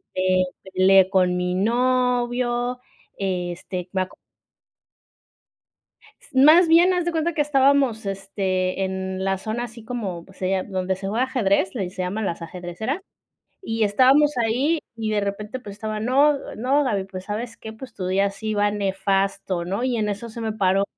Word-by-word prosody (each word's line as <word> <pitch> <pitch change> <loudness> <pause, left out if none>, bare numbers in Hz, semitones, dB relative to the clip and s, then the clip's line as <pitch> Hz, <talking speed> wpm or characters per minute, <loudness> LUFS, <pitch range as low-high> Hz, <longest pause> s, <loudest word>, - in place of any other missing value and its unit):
me 185 0 +2 0.3
peleé 190 0 +5
con 185 -2 +2
mi 180 0 -1
novio, 245 +2 +1 0.4
este, 180 -1 -3
me 190 - 0
acu 185 - -12 2.2
más 310 +6 +7
bien, 345 +3 +6
haz 360 -1 0
de 345 - 0
cuenta 330 +1 0
que 305 - -2
estábamos, 275 -5 +3
este, 195 -1 -2
en 190 0 -3
la 195 0 0
zona 220 +4 -3
así 230 -1 -10
como, 200 -9 -4
pues 190 - -19
sería 185 0 0
donde 190 -1 -2
se 195 0 -5
juega 235 +5 +1
ajedrez, 200 -6 +1
le 195 -6 -2
se 185 -1 -5
llama 185 +4 -2
Las 170 -4 -3
Ajedrecera, 180 - -5 0.6
y 225 - -2
estábamos 265 +8 +4
ahí 250 +8 +1 0.2
y 220 -1 -2
de 210 -1 +1
repente, 210 +5 -4
pues, 205 -4 -9
estaba: 215 -1 -4
"No 275 +6 +4 0.2
no, 270 +6 +2
Gaby, 205 -6 0
pues, 190 -1 -8
¿sabes 230 +3 -5
qué?, 220 - -8
pues, 255 +3 -10
tu 185 -2 -5
día 195 +2 +2
sí 215 +2 -4
va 205 0 +2
nefasto", 195 -2 -1
¿no?, 195 +6 -2
y 250 -2 0
en 210 -1 0
eso 205 +3 -4
se 230 - -8
me 220 -1 -2
paró 195 -1 +2
210 Hz, 170 wpm, -23 LUFS, 190-250 Hz, 2.2 s, más